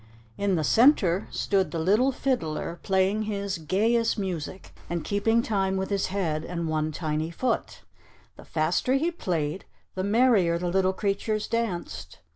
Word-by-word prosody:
In 200 Hz, +3 st, 0 dB
the 160 Hz, -, 0 dB
center 205 Hz, -, +4 dB
stood 190 Hz, -5 st, 0 dB
the 165 Hz, -, -4 dB
Little 210 Hz, +11 st, +3 dB
Fiddler, 175 Hz, -, -2 dB
playing 195 Hz, +2 st, +1 dB
his 200 Hz, -3 st, -3 dB
gayest 225 Hz, +9 st, +1 dB
music, 185 Hz, -2 st, -5 dB, 0.2 s
and 170 Hz, -1 st, -2 dB
keeping 225 Hz, +3 st, +1 dB
time 195 Hz, -4 st, 0 dB
with 190 Hz, +1 st, -3 dB
his 200 Hz, -1 st, +1 dB
head 170 Hz, -6 st, -1 dB
and 170 Hz, -1 st, -4 dB
one 155 Hz, 0 st, -1 dB
tiny 155 Hz, 0 st, -2 dB
foot. 230 Hz, +8 st, -2 dB, 0.5 s
The -, -, -13 dB
faster 165 Hz, +10 st, 0 dB
he 320 Hz, +5 st, +1 dB
played, 175 Hz, -, -3 dB, 0.3 s
the 185 Hz, -, -3 dB
merrier 205 Hz, -5 st, +3 dB
the 175 Hz, +1 st, -2 dB
little 190 Hz, +1 st, +2 dB
creatures 210 Hz, +2 st, -1 dB
danced. 230 Hz, -6 st, -3 dB
190 Hz, 150 wpm, -26 LUFS, 170-215 Hz, 0.5 s, center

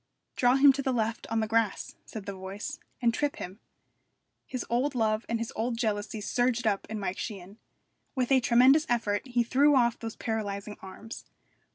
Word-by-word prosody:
'Draw 245 Hz, 0 st, +4 dB
him 275 Hz, 0 st, +7 dB
to 275 Hz, -, -2 dB
the 265 Hz, -, 0 dB
left 230 Hz, -2 st, -1 dB
on 225 Hz, 0 st, 0 dB
the 220 Hz, -, -1 dB
grass,' 225 Hz, -2 st, 0 dB
said 215 Hz, -3 st, -7 dB
the 200 Hz, -, -4 dB
voice, 190 Hz, +2 st, -6 dB, 0.2 s
'and 235 Hz, -1 st, +4 dB
trip 290 Hz, +3 st, -1 dB
him.' 185 Hz, +4 st, -8 dB, 0.9 s
His 255 Hz, -, -4 dB
old 255 Hz, +4 st, 0 dB
love 220 Hz, -1 st, 0 dB
and 230 Hz, -, +1 dB
his 230 Hz, 0 st, -5 dB
old 230 Hz, +1 st, -1 dB
jealousy 215 Hz, -2 st, -2 dB
surged 245 Hz, +2 st, 0 dB
up 205 Hz, -3 st, 0 dB
in 220 Hz, -1 st, -4 dB
Mike 190 Hz, -2 st, -3 dB
Sheehan. 200 Hz, 0 st, -7 dB, 0.6 s
With 255 Hz, -1 st, 0 dB
a 265 Hz, -, +6 dB
tremendous 255 Hz, +5 st, +5 dB
effort 215 Hz, -4 st, +1 dB
he 245 Hz, -1 st, +1 dB
threw 280 Hz, +5 st, +4 dB
off 235 Hz, -2 st, +3 dB
those 225 Hz, -1 st, -6 dB
paralysing 210 Hz, -2 st, -4 dB
arms. 195 Hz, +4 st, -9 dB
230 Hz, 185 wpm, -29 LUFS, 210-245 Hz, 0.9 s, him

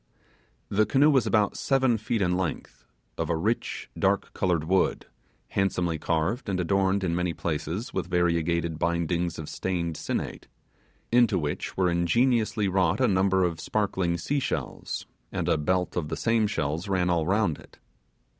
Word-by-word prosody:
The 105 Hz, +1 st, +2 dB
canoe 140 Hz, +6 st, +5 dB
was 135 Hz, -3 st, +3 dB
about 105 Hz, -2 st, +2 dB
seven 130 Hz, -3 st, +2 dB
feet 110 Hz, 0 st, -1 dB
in 90 Hz, 0 st, +1 dB
length; 75 Hz, -8 st, -4 dB, 0.3 s
of -, -, -1 dB
a 85 Hz, -, +2 dB
rich, 110 Hz, +8 st, -2 dB
dark -, -, 0 dB
coloured 85 Hz, -4 st, 0 dB
wood, 95 Hz, +4 st, +1 dB, 0.4 s
handsomely 90 Hz, -4 st, 0 dB
carved 90 Hz, -, -1 dB
and 95 Hz, -2 st, -1 dB
adorned 95 Hz, +2 st, +1 dB
in 85 Hz, -2 st, 0 dB
many 90 Hz, -1 st, -1 dB
places 85 Hz, +6 st, -3 dB
with -, -, -3 dB
variegated 85 Hz, -2 st, +1 dB
bindings 85 Hz, 0 st, 0 dB
of 80 Hz, -, -6 dB
stained 85 Hz, -3 st, -2 dB
sinnate, -, -, -4 dB, 0.6 s
into 120 Hz, -4 st, +4 dB
which 75 Hz, -4 st, -3 dB
were 95 Hz, -1 st, +3 dB
ingeniously 110 Hz, +5 st, +2 dB
wrought 95 Hz, 0 st, +2 dB
a 130 Hz, -, +4 dB
number 95 Hz, -1 st, +3 dB
of 85 Hz, -3 st, -1 dB
sparkling 95 Hz, -3 st, 0 dB
seashells, 140 Hz, +8 st, -3 dB, 0.3 s
and -, -, -2 dB
a -, -, +3 dB
belt 90 Hz, +4 st, 0 dB
of 85 Hz, -4 st, -1 dB
the -, -, -3 dB
same 115 Hz, -2 st, +2 dB
shells 80 Hz, -2 st, -2 dB
ran 90 Hz, -2 st, +1 dB
all 85 Hz, -2 st, +1 dB
round 95 Hz, -5 st, +1 dB
it. -, -, -17 dB
90 Hz, 155 wpm, -27 LUFS, 85-105 Hz, 0.6 s, canoe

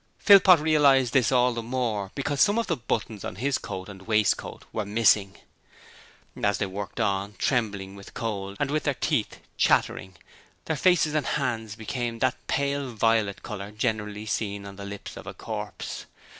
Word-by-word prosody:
Philpot 190 Hz, -4 st, +7 dB
realized 140 Hz, -5 st, +4 dB
this 130 Hz, -3 st, +3 dB
all 125 Hz, -1 st, +3 dB
the 115 Hz, -, -3 dB
more 115 Hz, -5 st, -2 dB
because 140 Hz, 0 st, -1 dB
some 205 Hz, +1 st, +4 dB
of 230 Hz, -, +1 dB
the 170 Hz, -, 0 dB
buttons 110 Hz, -4 st, -3 dB
on -, -, -5 dB
his 130 Hz, +6 st, 0 dB
coat 95 Hz, 0 st, -6 dB
and 95 Hz, -1 st, -11 dB
waistcoat 110 Hz, -2 st, 0 dB
were 110 Hz, -, -1 dB
missing. 105 Hz, -2 st, +2 dB, 1.1 s
As 100 Hz, -1 st, +2 dB
they 105 Hz, -, 0 dB
worked 100 Hz, +4 st, -6 dB
on, 100 Hz, -1 st, -1 dB
trembling 100 Hz, -6 st, -1 dB
with 100 Hz, 0 st, -13 dB
cold, 100 Hz, -3 st, -4 dB
and 145 Hz, -1 st, 0 dB
with 155 Hz, +1 st, +1 dB
their 145 Hz, -3 st, +1 dB
teeth -, -, -1 dB, 0.2 s
chattering, 95 Hz, -1 st, +1 dB, 0.5 s
their 160 Hz, -, -1 dB
faces 165 Hz, -1 st, +3 dB
and 155 Hz, -2 st, 0 dB
hands 115 Hz, -6 st, -2 dB
became 120 Hz, +1 st, -3 dB
of 115 Hz, -, -13 dB
that 130 Hz, -1 st, 0 dB
pale 140 Hz, -1 st, 0 dB
violet 110 Hz, -3 st, +1 dB
colour 100 Hz, -2 st, -6 dB
generally 105 Hz, -1 st, -2 dB
seen 100 Hz, -1 st, -3 dB
on 100 Hz, 0 st, -9 dB
the 100 Hz, 0 st, -8 dB
lips 100 Hz, 0 st, -8 dB
of -, -, -10 dB
a -, -, -7 dB
corpse. -, -, -6 dB
115 Hz, 175 wpm, -26 LUFS, 100-135 Hz, 1.1 s, Philpot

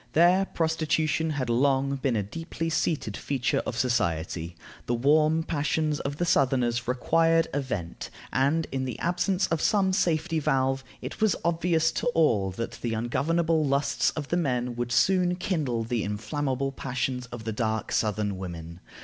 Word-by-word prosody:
There 180 Hz, +4 st, +5 dB
prostitution 160 Hz, -1 st, 0 dB
had 140 Hz, -5 st, -2 dB
long 135 Hz, +3 st, +2 dB
been 130 Hz, -2 st, 0 dB
a 105 Hz, -, 0 dB
deeply 165 Hz, -, -5 dB
seated 150 Hz, -10 st, -1 dB
feature 135 Hz, -3 st, -1 dB
of 115 Hz, -, -3 dB
society. 85 Hz, -8 st, -1 dB, 0.3 s
The 120 Hz, -, +1 dB
warm 155 Hz, +5 st, +3 dB
passions 155 Hz, -1 st, 0 dB
of 140 Hz, +1 st, -3 dB
the 175 Hz, -, 0 dB
southerners 125 Hz, -6 st, +2 dB
required 165 Hz, +6 st, +2 dB
a 145 Hz, -, +1 dB
vent, 90 Hz, -11 st, -5 dB, 0.2 s
and, 145 Hz, +5 st, +2 dB
in 130 Hz, -1 st, -2 dB
the 125 Hz, -3 st, -4 dB
absence 180 Hz, +2 st, 0 dB
of 165 Hz, -1 st, 0 dB
some 195 Hz, -3 st, +2 dB
safety 165 Hz, -3 st, +1 dB
valve, 135 Hz, -2 st, +1 dB, 0.2 s
it -, -, -7 dB
was 215 Hz, -3 st, +3 dB
obvious 165 Hz, -1 st, +2 dB
to 225 Hz, -, -2 dB
all 110 Hz, -12 st, +3 dB
that 115 Hz, +5 st, -5 dB
the 115 Hz, -2 st, -1 dB
ungovernable 155 Hz, +8 st, +1 dB
lusts 140 Hz, 0 st, +1 dB
of 150 Hz, -3 st, -5 dB
the 175 Hz, -, +1 dB
men 125 Hz, -7 st, -1 dB
would 120 Hz, 0 st, -3 dB
soon 180 Hz, +5 st, +3 dB
kindle 150 Hz, -11 st, -1 dB
the 115 Hz, 0 st, -1 dB
inflammable 130 Hz, +6 st, -2 dB
passions 130 Hz, -1 st, -3 dB
of 115 Hz, -1 st, -8 dB
the 110 Hz, 0 st, -3 dB
dark 110 Hz, 0 st, -2 dB
southern 105 Hz, -3 st, 0 dB
women. 85 Hz, -2 st, -7 dB
140 Hz, 160 wpm, -27 LUFS, 120-160 Hz, 0.3 s, There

